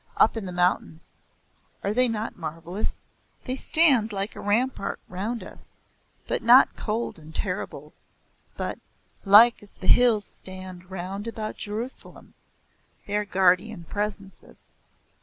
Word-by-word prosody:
Up - - +4
in 215 -4 -4
the - - -5
mountains. 175 -2 -1 0.7
Are 200 - 0
they 250 +2 +3
not 225 -1 -3
marvellous? 165 +4 -4 0.4
They 255 - -2
stand 270 -7 +3
like 200 0 -4
a - - -9
rampart 215 0 -1
round 210 +6 -4
us, - - -13 0.5
but - - -1
not 245 +3 +6
cold 220 -4 -3
and 155 0 -14
terrible, - - -1 0.6
but - - -3 0.5
"Like 220 +4 +7
as 205 - -9
the 190 - -10
hills 230 -1 +4
stand 185 -1 -7
round 190 +3 -5
about 220 -2 -5
Jerusalem" 220 +5 -7 0.7
they 205 - -3
are 210 0 0
guardian 185 +1 +2
presences. 205 +1 -6
205 Hz, 130 wpm, -25 LUFS, 185-225 Hz, 0.7 s, Like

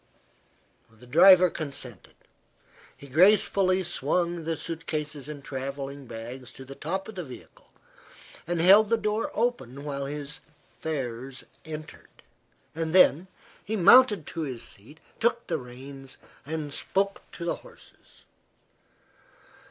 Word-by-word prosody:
The 115 +2 -18
driver 180 +6 +7
consented. 135 - -8 0.8
He - - -13
gracefully 185 +4 +4
swung 170 +1 -1
the 165 -1 -2
suit 165 +1 -6
cases 150 -2 -4
and 145 -2 -8
travelling 135 0 -6
bags 120 +3 -8
to 130 - -11
the 135 - -9
top 190 +7 -4
of 220 - -8
the 180 -3 -5
vehicle 130 -5 -13 0.8
and 175 -1 -1
held 200 +5 +7
the 230 - +3
door 215 0 -1
open 215 - -2
while 140 -1 -4
his 145 0 -6 0.4
fares 130 -4 -4 0.2
entered. 155 0 -10 0.5
Then 165 +1 +4 0.4
he 220 - -3
mounted 210 - +6
to 165 - -5
his 130 -6 -5
seat, 120 +6 -13 0.2
took 235 +1 +1
the - - -2
reins, 135 +2 -11 0.3
and 155 -2 -4
spoke 195 +1 -1
to 170 - -6
the 170 - -1
horses. - - -18
155 Hz, 125 wpm, -27 LUFS, 135-185 Hz, 0.8 s, driver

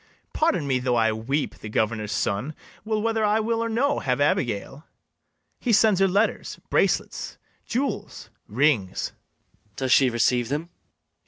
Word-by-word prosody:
Pardon 310 - +1
me 130 -2 +1
though 125 -1 0
I 110 -1 +3
weep: 125 +7 -2
the 105 - -8
governor's 110 -1 -1
son 125 +10 -2 0.3
Will, 215 -1 -1
whether 225 -1 0
I 210 +1 +3
will 225 +1 0
or 230 - -2
no, 275 +6 +1
have 125 -1 -1
Abigail; 135 0 -1 0.7
He 245 - -1
sends 215 -3 +4
her 195 - +4
letters, 200 +4 0
bracelets, - - 0 0.3
jewels, 270 +3 -3 0.2
rings. 115 -5 +1
MATHIAS. 105 -2 -40
Does 130 -1 -2
she 130 0 +6
receive 120 0 +1
them? 155 +5 -3
145 Hz, 150 wpm, -24 LUFS, -, 0.7 s, she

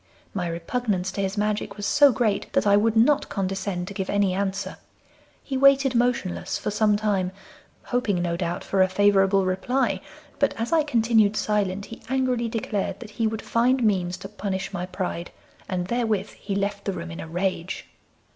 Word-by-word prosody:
My 180 -3 -2
repugnance 185 +2 -2
to 200 - -3
his 195 +1 -2
magic 210 -1 -1
was 205 - -4
so 290 +2 +6
great 215 -4 0
that - - +2
I 200 0 +5
would 220 +2 +3
not 280 +6 +4
condescend 195 -2 -2
to 200 - -6
give 190 -1 -3
any 200 -2 +2
answer. 195 0 -2 0.7
He 270 - -3
waited 275 0 +5
motionless 235 -6 0
for - - -3
some 210 0 +3
time, 200 -4 0 0.5
hoping 225 -7 0
no 175 -1 -1
doubt 175 0 -3
for 195 - +1
a 185 - +4
favourable 195 0 +4
reply, 190 +9 0 0.4
but 280 - +2
as 230 +7 -1
I 325 - +5
continued 225 -6 +3
silent 200 -2 0
he 230 - -10
angrily 255 -3 0
declared 215 -3 -2
that 235 -3 -9
he 220 +1 0
would 220 0 -4
find 250 +2 +2
means 185 -4 +1
to 195 - -8
punish 195 -1 -4
my 180 -1 -3
pride, 180 -2 -4 0.4
and 180 -1 -1
therewith 220 -2 0
he 200 -1 -5
left 200 0 -2
the 195 - -1
room 170 -1 -6
in 165 - -7
a - - -6
rage. 180 +1 -2
205 Hz, 185 wpm, -25 LUFS, 190-230 Hz, 0.7 s, so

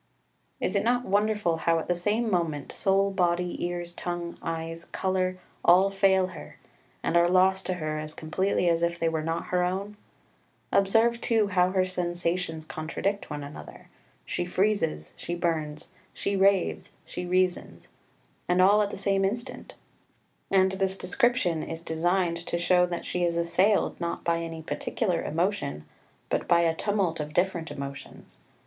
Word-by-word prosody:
3 - - -2
Is 185 - -1
it 200 - +2
not 245 +2 +1
wonderful 205 -4 +1
how 165 0 +2
at 165 - -3
the 180 - +2
same 210 +7 0
moment 160 -6 -1
soul, 195 0 +2
body, 180 -1 0
ears, 175 0 -3
tongue, 175 -1 -4
eyes, 165 0 -4
colour, 185 -1 -1 0.3
all 185 +3 +6
fail 195 -1 +3
her, 165 -5 -11 0.5
and - - 0
are 170 0 +5
lost 190 +1 +3
to 185 - 0
her 155 -2 -3
as 155 0 -7
completely 180 +3 0
as 165 -1 +2
if 170 0 0
they 165 - 0
were 160 -1 0
not 165 +1 -3
her 180 0 +2
own? 195 +3 -2 0.8
Observe 225 +4 +3
too 220 -3 +2
how 180 -1 +3
her 185 0 +2
sensations 175 -2 -2
contradict 165 +6 -3
one 145 -1 -5
another 140 +1 -11 0.4
she - - -2
freezes, 180 - 0
she 175 - -4
burns, 155 -3 -2 0.2
she 200 - -1
raves, 195 -1 +2
she 180 - -6
reasons, 185 0 0 0.6
and 180 +1 +2
all 200 +3 +6
at 205 - 0
the - - -6
same 195 0 +1
instant. 230 +5 -4 0.7
And 190 -1 +4
this 190 0 0
description 185 -5 +1
is 165 +1 -6
designed 170 +1 0
to - - -1
show 180 +1 +3
that 175 -1 -4
she 180 - -1
is 170 -1 +1
assailed, 180 +5 +2
not 170 0 -3
by 170 -1 +1
any 165 -1 -6
particular 180 +2 -1
emotion, 160 - -2 0.5
but - - 0
by 170 0 +5
a 165 -1 +2
tumult 190 -2 0
of 150 0 -4
different 175 -2 0
emotions. 140 0 -9
180 Hz, 165 wpm, -27 LUFS, 165-195 Hz, 0.8 s, all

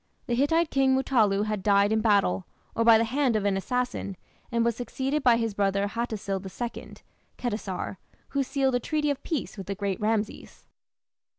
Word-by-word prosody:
The 240 - -2
Hittite 305 +6 +2
king 270 -1 +3
Mutallu 220 -6 +2
had 215 -2 -2
died 200 +1 +3
in 220 0 +2
battle, 200 - +2 0.3
or 230 - +1
by 230 -1 +7
the 225 - +2
hand 255 +1 +1
of 210 -2 0
an 200 -1 +2
assassin, 245 -2 -2 0.3
and 235 -1 +1
was 235 -1 +1
succeeded 265 +4 -2
by 245 -3 +5
his 225 -2 -1
brother 200 0 +1
Hattusil 210 -4 -3
II 235 +5 -6 0.4
(Khetasar), 210 -5 -3 0.3
who 280 - 0
sealed 270 0 0
a 245 - +2
treaty 300 +3 0
of 280 -1 -4
peace 290 - -4
with 190 - -7
the 200 - -3
great 200 -1 -3
Rameses. 215 0 -2
230 Hz, 180 wpm, -27 LUFS, 200-265 Hz, 0.4 s, by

